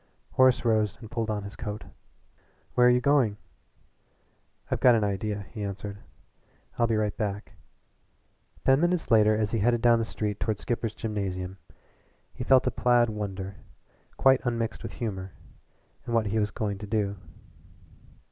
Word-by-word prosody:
Horace 130 Hz, -1 st, +4 dB
rose 110 Hz, -3 st, +2 dB
and 110 Hz, -2 st, -11 dB
pulled 115 Hz, -2 st, -2 dB
on 105 Hz, -1 st, -2 dB
his 100 Hz, +1 st, -8 dB
coat. 105 Hz, -1 st, -5 dB, 0.9 s
"Where 125 Hz, 0 st, +5 dB
are -, -, +7 dB
you 125 Hz, 0 st, +4 dB
going?" 125 Hz, -5 st, +2 dB, 1.3 s
"I've -, -, 0 dB
got 125 Hz, -2 st, +6 dB
an 110 Hz, -, +1 dB
idea," 100 Hz, 0 st, -2 dB
he 105 Hz, -3 st, -5 dB
answered. 100 Hz, 0 st, -5 dB, 0.8 s
"I'll 120 Hz, -, +4 dB
be 115 Hz, -, +1 dB
right 105 Hz, -1 st, 0 dB
back." 105 Hz, -1 st, -4 dB, 1.1 s
Ten 135 Hz, +2 st, +5 dB
minutes 175 Hz, -5 st, 0 dB
later 110 Hz, -1 st, +5 dB
as 110 Hz, -1 st, 0 dB
he 115 Hz, -, 0 dB
headed 120 Hz, +2 st, +2 dB
down 120 Hz, -1 st, +5 dB
the -, -, 0 dB
street 105 Hz, -2 st, -3 dB
toward 110 Hz, -2 st, -1 dB
Skipper's 115 Hz, -1 st, -3 dB
Gymnasium 95 Hz, -4 st, -4 dB, 0.7 s
he 125 Hz, -, -5 dB
felt 130 Hz, +1 st, +5 dB
a -, -, +1 dB
placid 120 Hz, -2 st, +3 dB
wonder, 100 Hz, -2 st, -5 dB, 0.6 s
quite 135 Hz, 0 st, +5 dB
unmixed 115 Hz, -2 st, -2 dB
with -, -, -7 dB
humor, 95 Hz, -5 st, -5 dB, 0.7 s
at -, -, -5 dB
what 115 Hz, -2 st, +2 dB
he 110 Hz, +2 st, 0 dB
was 105 Hz, -1 st, +1 dB
going 100 Hz, 0 st, -3 dB
to 105 Hz, -, -7 dB
do. 100 Hz, -1 st, -1 dB
110 Hz, 160 wpm, -27 LUFS, 100-120 Hz, 1.3 s, are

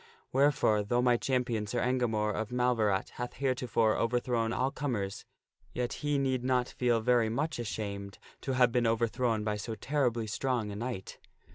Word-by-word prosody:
Wherefore, 135 Hz, -6 st, +3 dB
though 120 Hz, +4 st, +1 dB
my 125 Hz, -1 st, +4 dB
champion 120 Hz, -4 st, 0 dB
Sir 120 Hz, +4 st, -1 dB
Engamore 115 Hz, -4 st, +1 dB
of 110 Hz, +1 st, -3 dB
Mal 125 Hz, 0 st, +2 dB
verat 105 Hz, -3 st, +1 dB
hath 125 Hz, -, -4 dB
heretofore 125 Hz, -4 st, +1 dB
overthrown 115 Hz, -1 st, 0 dB
all 130 Hz, +3 st, 0 dB
comers, 105 Hz, -10 st, -3 dB, 0.5 s
yet 125 Hz, -1 st, -2 dB
he 145 Hz, -1 st, +1 dB
need 130 Hz, -2 st, 0 dB
not 125 Hz, -1 st, +2 dB
feel 120 Hz, -2 st, +1 dB
very 120 Hz, -1 st, +3 dB
much 150 Hz, +5 st, -2 dB
ashamed 100 Hz, -3 st, -4 dB, 0.2 s
to 135 Hz, -, -2 dB
have 125 Hz, -1 st, +4 dB
been 120 Hz, -1 st, +2 dB
overthrown 115 Hz, 0 st, +1 dB
by 105 Hz, -1 st, -1 dB
so 110 Hz, +2 st, -5 dB
terribly 120 Hz, -1 st, 0 dB
strong 115 Hz, -1 st, -1 dB
a -, -, -6 dB
knight." 115 Hz, -3 st, -5 dB
120 Hz, 165 wpm, -31 LUFS, 110-125 Hz, 0.5 s, my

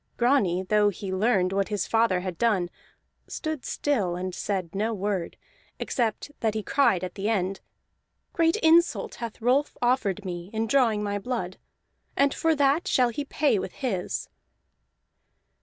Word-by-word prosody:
Grani, 210 Hz, -8 st, +2 dB
though 210 Hz, +2 st, +3 dB
he 195 Hz, 0 st, -5 dB
learned 190 Hz, -2 st, +2 dB
what 195 Hz, 0 st, +1 dB
his 205 Hz, -3 st, -1 dB
father 225 Hz, -5 st, +2 dB
had 180 Hz, -2 st, -5 dB
done, 200 Hz, -7 st, +1 dB, 0.6 s
stood 315 Hz, -4 st, -4 dB
still 210 Hz, -12 st, -1 dB
and 185 Hz, +1 st, -4 dB
said 185 Hz, -5 st, -3 dB
no 215 Hz, +3 st, -1 dB
word, 195 Hz, -3 st, -3 dB, 0.4 s
except 235 Hz, +3 st, -2 dB
that 220 Hz, -2 st, 0 dB
he 215 Hz, -, -2 dB
cried 195 Hz, -10 st, +2 dB
at 185 Hz, -, -4 dB
the 200 Hz, +2 st, -2 dB
end: 195 Hz, -3 st, 0 dB, 0.7 s
"Great 330 Hz, 0 st, +3 dB
insult 335 Hz, +2 st, +4 dB
hath 230 Hz, -2 st, -5 dB
Rolf 260 Hz, +5 st, +1 dB
offered 210 Hz, -6 st, 0 dB
me 175 Hz, 0 st, -5 dB
in 220 Hz, +1 st, 0 dB
drawing 225 Hz, -4 st, +2 dB
my 205 Hz, 0 st, -2 dB
blood, 195 Hz, -5 st, -4 dB, 0.6 s
and 280 Hz, 0 st, +3 dB
for 325 Hz, -1 st, +1 dB
that 285 Hz, +3 st, +2 dB
shall 250 Hz, -2 st, +3 dB
he 260 Hz, +5 st, -3 dB
pay 285 Hz, -7 st, +1 dB
with 185 Hz, -, -5 dB
his." 180 Hz, -, -3 dB
210 Hz, 155 wpm, -26 LUFS, 185-255 Hz, 0.7 s, insult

